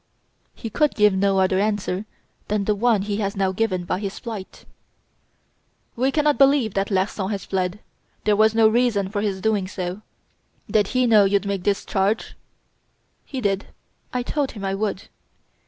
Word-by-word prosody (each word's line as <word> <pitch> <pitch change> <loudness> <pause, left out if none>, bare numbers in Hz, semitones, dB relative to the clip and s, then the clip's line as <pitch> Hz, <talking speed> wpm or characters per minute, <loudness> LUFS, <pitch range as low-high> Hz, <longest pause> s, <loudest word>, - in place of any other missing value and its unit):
"He 225 - -7
could 300 +7 +1
give 210 -2 +4
no 195 0 +2
other 190 0 +2
answer 205 -1 -1 0.4
than 210 -1 0
the 210 - +2
one 215 -1 +2
he 205 0 -2
has 200 -2 -2
now 190 -1 +1
given 190 -3 -1
by 180 - -1
his 200 -2 -5
flight." 215 -5 -8 1.3
"We 260 +3 +1
cannot 295 0 +2
believe 275 -6 +4
that 195 0 -1
Larsan 190 0 -1
has 200 -3 -4
fled. 185 0 -1 0.5
There 210 -1 +3
was 220 +1 +4
no 225 -1 +6
reason 220 -4 +2
for 205 0 -2
his 195 -3 -2
doing 205 -2 +1
so. 185 +1 -5 0.7
Did 210 -2 +3
he 255 +3 +1
know 215 -4 +6
you'd 200 +1 +1
make 200 -2 -2
this 200 -1 0
charge?" 195 +3 0 0.9
"He 265 -2 -5
did. 200 -2 -1 0.4
I 250 -1 -1
told 285 +1 -2
him 200 -3 -6
I 195 - -1
would." 200 0 -2
205 Hz, 170 wpm, -23 LUFS, 195-220 Hz, 1.3 s, no